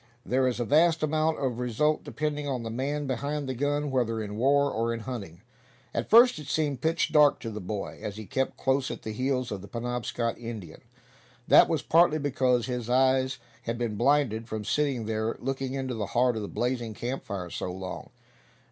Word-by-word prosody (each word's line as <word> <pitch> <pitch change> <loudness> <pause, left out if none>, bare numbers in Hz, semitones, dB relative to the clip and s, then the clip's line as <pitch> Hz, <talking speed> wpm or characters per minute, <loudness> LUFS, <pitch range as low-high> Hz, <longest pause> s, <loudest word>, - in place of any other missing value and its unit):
There 130 +1 +2
is 125 -1 -1
a 120 - 0
vast 160 +4 +4
amount 155 +1 +1
of 130 -4 -2
result 125 +6 +1
depending 150 -1 -3
on 130 -4 -2
the 115 - -4
man 145 +5 -2
behind 140 +2 -2
the 130 - -2
gun, 145 +2 -1
whether 115 -4 0
in 105 -1 -5
war, 140 +4 +3
or 115 +1 0
in 115 - -6
hunting. 100 -7 -7 0.5
At - - -2
first 235 -4 +7
it 150 - -9
seemed 145 -4 -1
pitch 165 +3 +1
dark 150 -2 +6
to 115 - -5
the 105 0 -6
boy, 100 +2 -5
as 105 0 -5
he 110 - -7
kept 135 +2 -2
close 135 0 +1
at - - -6
the 110 - -4
heels 130 +1 -1
of 100 -2 -4
the 100 - -10
Penobscot 120 +1 -3
Indian. 110 -9 -7 0.7
That - - +7
was 160 -3 0
partly 165 -1 +4
because 130 -4 +1
his 125 -2 -4
eyes 130 0 +3 0.2
had 115 -1 -3
been 115 -3 -2
blinded 120 -2 +2
from 110 -1 -4
sitting 135 -3 0
there, 110 +1 -1
looking 135 0 -3
into 130 -2 -3
the 110 -4 -3
heart 125 -1 +4
of 110 - -3
the 100 - -4
blazing 120 -2 -2
camp 125 +5 -4
fire 90 -5 -5
so 90 - -4
long. 95 0 -7
125 Hz, 200 wpm, -28 LUFS, 115-145 Hz, 0.7 s, first